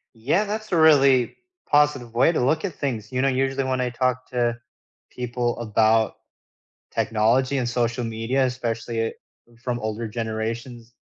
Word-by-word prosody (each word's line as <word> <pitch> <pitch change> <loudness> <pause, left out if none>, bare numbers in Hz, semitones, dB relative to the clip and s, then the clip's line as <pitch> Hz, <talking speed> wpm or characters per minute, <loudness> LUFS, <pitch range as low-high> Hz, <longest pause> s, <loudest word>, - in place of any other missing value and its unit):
Yeah, 145 - +1
that's 215 +1 -5
a 175 - +2
really 140 -6 +5 0.3
positive 145 -5 +2
way 125 +7 +4
to 155 - 0
look 155 +7 +1
at 185 - -3
things. 115 -8 -4
You 130 0 0
know, 135 - +2
usually 135 +1 0
when 130 -1 -1
I 125 - 0
talk 130 +1 -1
to 120 -1 0 0.5
people 120 -1 -2
about 110 -1 +2 0.8
technology 115 +5 +1
and 125 -2 -1
social 120 0 -1
media, 115 +4 0
especially, 115 -2 -2
uh, - - -5 0.5
from 125 -1 -2
older 110 +1 -3
generations, 115 +2 -5
125 Hz, 150 wpm, -24 LUFS, 115-135 Hz, 0.8 s, really